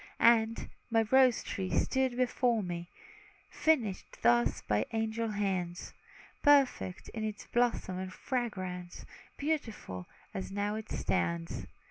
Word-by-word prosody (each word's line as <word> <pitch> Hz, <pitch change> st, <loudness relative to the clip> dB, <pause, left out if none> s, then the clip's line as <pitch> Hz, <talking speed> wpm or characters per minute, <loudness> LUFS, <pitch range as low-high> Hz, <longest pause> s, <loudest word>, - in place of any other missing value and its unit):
And, 230 Hz, -1 st, +4 dB, 0.2 s
my 225 Hz, -1 st, +4 dB
rose 260 Hz, -2 st, +5 dB
tree 190 Hz, -1 st, -3 dB
stood 260 Hz, -2 st, +1 dB
before 245 Hz, -3 st, +2 dB
me, 175 Hz, -1 st, -5 dB, 0.6 s
Finished 240 Hz, -12 st, 0 dB
thus 120 Hz, +1 st, +4 dB
by 105 Hz, +1 st, 0 dB
angel 225 Hz, +1 st, 0 dB
hands; 190 Hz, -4 st, -2 dB, 0.5 s
Perfect 275 Hz, -, +3 dB
in 220 Hz, -, -5 dB
its 215 Hz, -1 st, -4 dB
bloom 240 Hz, 0 st, +3 dB, 0.3 s
and 185 Hz, 0 st, -4 dB
fragrance, 185 Hz, -7 st, -4 dB, 0.3 s
Beautiful, 230 Hz, -, -3 dB, 0.3 s
as 190 Hz, 0 st, -4 dB
now 205 Hz, +1 st, -1 dB
it 220 Hz, 0 st, -5 dB
stands. 85 Hz, -1 st, -1 dB
215 Hz, 115 wpm, -32 LUFS, 180-240 Hz, 0.6 s, rose